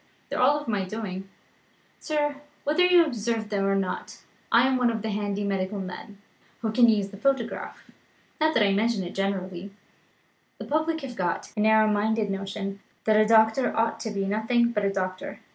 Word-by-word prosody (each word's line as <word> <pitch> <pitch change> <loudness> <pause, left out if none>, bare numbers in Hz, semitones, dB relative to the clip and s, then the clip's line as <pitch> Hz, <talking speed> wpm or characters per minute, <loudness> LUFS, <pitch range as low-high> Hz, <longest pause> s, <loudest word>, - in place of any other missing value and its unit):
They - - -2
are 285 +4 +3
of 295 - -10
my 205 -4 0
doing, 195 -1 -6 0.7
sir 295 -2 -1 0.3
whether 305 +5 +2
you 360 -2 +6
observed 225 -5 -3
them 200 -1 0
or 195 0 +2
not 195 -2 -4 0.3
I 235 +2 +6
am 265 0 +2
one 250 -1 +3
of 220 -2 -3
the 220 - -2
handy 205 0 -2
medical 195 0 -2
men, 195 +2 -8 0.5
who 220 - 0
can 235 +1 +5
use 205 -3 +1
the 200 - -11
photograph. 270 +1 -2 0.5
Not 315 0 +2
that 230 - +4
I 200 - +2
mention 215 0 +1
it 175 - -7
generally; 195 -1 -3 0.9
the - - -7
public 315 +2 0
have 260 -3 -7
got 180 -4 -2
a - - -4
narrow 220 0 +5
minded 215 0 +1
notion 195 0 -4 0.2
that 215 - +3
a 215 0 +5
doctor 220 +3 +4
ought 225 0 +1
to 220 - -4
be 200 -2 -2
nothing 225 +4 +1
but 210 -3 -1
a 200 - +1
doctor. 185 -1 -4
215 Hz, 190 wpm, -26 LUFS, 195-235 Hz, 0.9 s, you